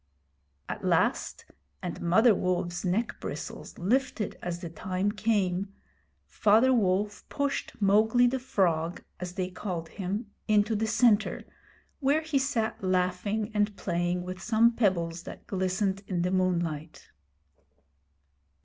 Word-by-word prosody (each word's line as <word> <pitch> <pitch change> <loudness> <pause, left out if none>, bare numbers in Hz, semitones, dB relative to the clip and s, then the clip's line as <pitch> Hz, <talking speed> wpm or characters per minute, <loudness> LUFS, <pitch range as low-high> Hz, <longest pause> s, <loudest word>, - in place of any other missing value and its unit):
At - - -5
last - - +1 0.4
and 175 - -4
Mother 220 +7 +5
Wolfs 180 -2 -1
neck 200 +6 -1
bristles - - -7
lifted 235 +2 0
as 175 -1 -3
the 170 - -5
time 185 +4 -1
came 200 -2 0 0.5
Father 225 +5 +4
Wolf 205 -2 +1
pushed 285 -1 -2
'Mowgli 220 +4 +4
the 260 +2 +1
Frog,' 175 -8 0 0.2
as 180 0 -5
they 185 -1 -3
called 175 -4 -5
him, 205 +2 -4 0.2
into 215 +1 +3
the 220 +1 0
centre, 220 -1 +3 0.6
where 290 +2 +2
he 315 -3 0
sat 235 -7 -1
laughing 185 +4 0
and 205 -1 0
playing 175 0 -1
with 185 +1 -6
some 230 +2 +4
pebbles 175 -7 0
that - - -10
glistened 190 +1 -1
in 175 -3 -1
the 180 - 0
moonlight. 170 -4 -1
195 Hz, 125 wpm, -28 LUFS, 180-220 Hz, 0.6 s, Mother